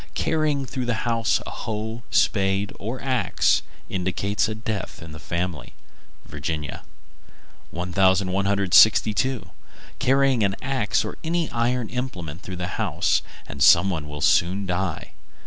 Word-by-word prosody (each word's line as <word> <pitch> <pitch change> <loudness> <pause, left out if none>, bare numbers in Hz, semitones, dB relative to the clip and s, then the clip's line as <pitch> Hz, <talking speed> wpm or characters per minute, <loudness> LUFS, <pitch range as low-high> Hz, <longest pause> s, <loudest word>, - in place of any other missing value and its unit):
Carrying 155 -3 0
through 130 -1 -4
the 115 -3 -1
house 115 -2 +1
a - - -6
hoe, 110 +2 -5
spade, 100 -1 +1
or 115 +6 -4
axe 130 -2 +2 0.3
indicates 100 +4 -1
a 110 - -3
death 110 -3 -5
in 80 -2 -10
the 80 - -9
family. 85 0 -4 0.5
Virginia. 75 +1 -4 0.9
1162. 95 +4 +3 0.5
Carry 135 +1 +3
an 100 -1 +1
axe 130 -6 0
or - - -7
any 165 0 -1
iron 120 0 0
implement 95 - -5
through 95 - -7
the 90 -1 -4
house, - - +1 0.2
and 70 - -9
some 85 +7 +6
one 75 -4 -4
will 75 0 -7
soon 95 +4 +3
die. 90 -2 -3
100 Hz, 130 wpm, -24 LUFS, 90-120 Hz, 0.9 s, some